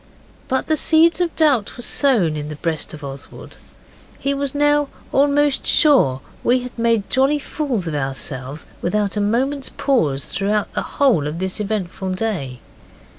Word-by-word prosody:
But 260 Hz, -, 0 dB
the 315 Hz, -, +1 dB
seeds 325 Hz, +3 st, +4 dB
of 345 Hz, -2 st, -1 dB
doubt 275 Hz, -11 st, +2 dB
were 245 Hz, -, -4 dB
sown 225 Hz, -, +2 dB
in 150 Hz, 0 st, -5 dB
the 150 Hz, -, -6 dB
breast 160 Hz, 0 st, -2 dB
of 150 Hz, -, -13 dB
Oswald. 140 Hz, 0 st, -9 dB, 0.6 s
He 280 Hz, -, -1 dB
was 280 Hz, 0 st, -2 dB
now 290 Hz, 0 st, +3 dB, 0.2 s
almost 285 Hz, 0 st, +2 dB
sure 245 Hz, -, +4 dB, 0.2 s
that -, -, -8 dB
we 250 Hz, +1 st, +4 dB
had 250 Hz, 0 st, -8 dB
made 230 Hz, -3 st, +1 dB
jolly 270 Hz, +3 st, +2 dB
fools 270 Hz, -, -3 dB
of 160 Hz, -, -3 dB
ourselves 135 Hz, 0 st, -2 dB, 0.2 s
without 205 Hz, +2 st, 0 dB
a 210 Hz, -, 0 dB
moment's 265 Hz, +6 st, 0 dB
pause 150 Hz, -, 0 dB
throughout 205 Hz, +1 st, -1 dB
the -, -, -1 dB, 0.2 s
whole 235 Hz, -, +3 dB
of 150 Hz, +2 st, -4 dB
this 190 Hz, +3 st, -3 dB
eventful 195 Hz, -3 st, -3 dB
day. 170 Hz, -, -3 dB
220 Hz, 165 wpm, -20 LUFS, -, 0.6 s, seeds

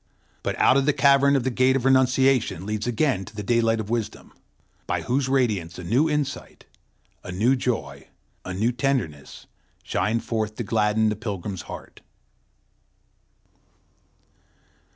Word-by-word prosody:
But -, -, -3 dB
out 130 Hz, -, +4 dB
of 135 Hz, +1 st, +1 dB
the 150 Hz, -, +4 dB
cavern 140 Hz, 0 st, +5 dB
the 130 Hz, -, -1 dB
Gate 130 Hz, +2 st, +3 dB
of 135 Hz, -2 st, -1 dB
Renunciation 130 Hz, -6 st, +3 dB
leads 105 Hz, +2 st, -3 dB
again 120 Hz, -4 st, 0 dB
to 115 Hz, -, -13 dB
the 105 Hz, -, -5 dB
daylight 115 Hz, 0 st, +2 dB
of 110 Hz, 0 st, -5 dB
wisdom, 115 Hz, -3 st, -4 dB, 0.5 s
by -, -, -1 dB
whose 130 Hz, +1 st, 0 dB
radiance 105 Hz, -10 st, 0 dB
a 90 Hz, -, -7 dB
new 125 Hz, -, +2 dB
insight, 150 Hz, -2 st, -3 dB, 0.6 s
a -, -, -7 dB
new 110 Hz, +9 st, +2 dB
joy, 75 Hz, -, -3 dB, 0.4 s
a 90 Hz, -, -6 dB
new 105 Hz, +6 st, 0 dB
tenderness, 120 Hz, -, -3 dB, 0.4 s
shine 110 Hz, +3 st, 0 dB
forth 110 Hz, -2 st, -3 dB
to 120 Hz, -, -4 dB
gladden 110 Hz, 0 st, +1 dB
the 105 Hz, -, -1 dB
pilgrim's 100 Hz, -3 st, -5 dB
heart. -, -, -10 dB
115 Hz, 140 wpm, -24 LUFS, 105-130 Hz, 0.6 s, cavern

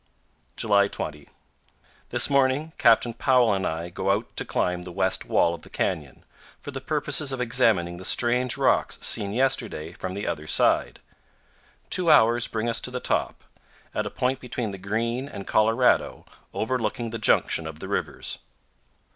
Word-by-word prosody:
July 100 Hz, -2 st, +3 dB
20. 75 Hz, -6 st, -7 dB, 0.8 s
This 120 Hz, 0 st, +2 dB
morning 140 Hz, +3 st, +1 dB
Captain 120 Hz, -3 st, +4 dB
Powell 120 Hz, -1 st, +3 dB
and 95 Hz, -1 st, -1 dB
I 80 Hz, +2 st, -4 dB
go 95 Hz, +2 st, -3 dB
out 105 Hz, +4 st, -1 dB
to -, -, -2 dB
climb 90 Hz, 0 st, -1 dB
the 90 Hz, -, -8 dB
west 95 Hz, +2 st, 0 dB
wall 85 Hz, -, +2 dB
of 85 Hz, -, -8 dB
the -, -, -15 dB
canyon, 70 Hz, -5 st, -3 dB, 0.3 s
for 145 Hz, -, -8 dB
the 135 Hz, 0 st, -6 dB
purpose 145 Hz, 0 st, -1 dB
of 130 Hz, -, -4 dB
examining 115 Hz, -8 st, +1 dB
the 90 Hz, -, -10 dB
strange 125 Hz, +5 st, +2 dB
rocks 135 Hz, -2 st, +2 dB
seen 100 Hz, -1 st, +2 dB
yesterday 115 Hz, -9 st, -1 dB
from 95 Hz, +1 st, -6 dB
the 100 Hz, -, -4 dB
other 75 Hz, +1 st, -4 dB
side. -, -, +1 dB, 0.9 s
Two 180 Hz, -2 st, +3 dB
hours 120 Hz, -4 st, +5 dB
bring 110 Hz, +1 st, -3 dB
us 115 Hz, +1 st, 0 dB
to -, -, -3 dB
the 125 Hz, 0 st, -4 dB
top, -, -, -2 dB, 0.5 s
at -, -, -2 dB
a -, -, -4 dB
point 130 Hz, +1 st, -1 dB
between 120 Hz, -4 st, -4 dB
the 100 Hz, -, -8 dB
Green 115 Hz, +7 st, -2 dB
and 100 Hz, -5 st, -8 dB
Colorado 115 Hz, +3 st, +2 dB, 0.3 s
overlooking 115 Hz, 0 st, -2 dB
the 115 Hz, -, -5 dB
junction 85 Hz, -5 st, +2 dB
of 80 Hz, -1 st, -8 dB
the -, -, -8 dB
rivers. -, -, -3 dB
115 Hz, 165 wpm, -25 LUFS, 95-130 Hz, 0.9 s, hours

